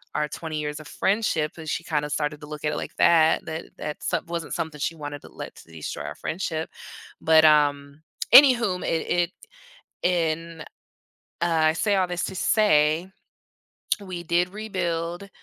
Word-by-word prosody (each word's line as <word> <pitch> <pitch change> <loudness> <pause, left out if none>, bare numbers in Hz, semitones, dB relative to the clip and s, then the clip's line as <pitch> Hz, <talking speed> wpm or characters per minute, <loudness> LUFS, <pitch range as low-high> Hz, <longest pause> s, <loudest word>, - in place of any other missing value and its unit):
our 150 0 +1
20 155 +1 -5
years 150 0 -4
of 155 - -11
friendship," 190 -5 0
and 160 -1 -9
she 170 - -2
kinda 150 -3 -1
started 150 -1 -2
to 150 - -9
look 150 -1 -8
at 150 - +1
it - - -3
like - - -6
that 160 -2 +4
that 160 +1 -5
that 150 - -5
some - - -1
wasn't 170 -2 -4
something 155 -2 -4
she 155 - -1
wanted 145 -2 -7
to - - -12
let - - -8
destroy 80 -4 -6
our 75 - -5
friendship, 160 - -3 0.5
but, 160 0 +6
um. 145 -1 +3 0.3
Any 265 +1 +10
whom, 205 -7 -2
it 165 - -1
it 175 0 +1 0.7
And 165 -2 0 0.8
I 160 -2 +3
say 205 +4 +1
all 185 - +2
this 175 0 -2
to 190 - -4
say, 170 -4 +3 0.9
we 185 -3 -6
did 175 +2 +1
rebuild 180 -3 -3
160 Hz, 165 wpm, -25 LUFS, 150-175 Hz, 0.9 s, Any